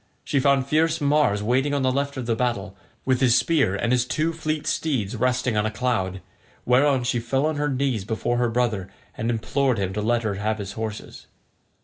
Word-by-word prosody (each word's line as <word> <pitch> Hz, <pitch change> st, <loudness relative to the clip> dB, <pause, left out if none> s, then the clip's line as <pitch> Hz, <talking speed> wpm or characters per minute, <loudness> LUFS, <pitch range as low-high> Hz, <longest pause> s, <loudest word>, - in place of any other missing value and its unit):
She 140 Hz, -, 0 dB
found 135 Hz, -1 st, +3 dB
fierce 155 Hz, +3 st, +1 dB
Mars 145 Hz, -8 st, +2 dB
waiting 130 Hz, +6 st, +1 dB
on 140 Hz, -, 0 dB
the 130 Hz, -, +2 dB
left 140 Hz, +1 st, -2 dB
of 130 Hz, -, -4 dB
the 115 Hz, -1 st, 0 dB
battle, 110 Hz, -5 st, -2 dB, 0.3 s
with 130 Hz, -1 st, +1 dB
his 125 Hz, -3 st, +5 dB
spear 140 Hz, -, +2 dB
and 115 Hz, +4 st, -1 dB
his 125 Hz, -1 st, +3 dB
two 155 Hz, +6 st, -1 dB
fleet 155 Hz, -2 st, -3 dB
steeds 125 Hz, -9 st, -1 dB
resting 125 Hz, 0 st, 0 dB
on 105 Hz, +1 st, +1 dB
a -, -, 0 dB
cloud; 100 Hz, -5 st, -1 dB, 0.4 s
whereon 130 Hz, +1 st, +3 dB
she 120 Hz, 0 st, 0 dB
fell 135 Hz, +5 st, 0 dB
on 155 Hz, -1 st, -1 dB
her 145 Hz, 0 st, 0 dB
knees 130 Hz, -6 st, -1 dB
before 115 Hz, +3 st, -1 dB
her 120 Hz, -1 st, +1 dB
brother 115 Hz, -5 st, -1 dB, 0.3 s
and 115 Hz, -, -2 dB
implored 125 Hz, +2 st, 0 dB
him 95 Hz, -1 st, -2 dB
to 105 Hz, -, -2 dB
let 120 Hz, +2 st, +1 dB
her 105 Hz, -2 st, -1 dB
have 110 Hz, +1 st, 0 dB
his 100 Hz, -2 st, -6 dB
horses. 110 Hz, -1 st, -7 dB
125 Hz, 210 wpm, -24 LUFS, 110-140 Hz, 0.4 s, his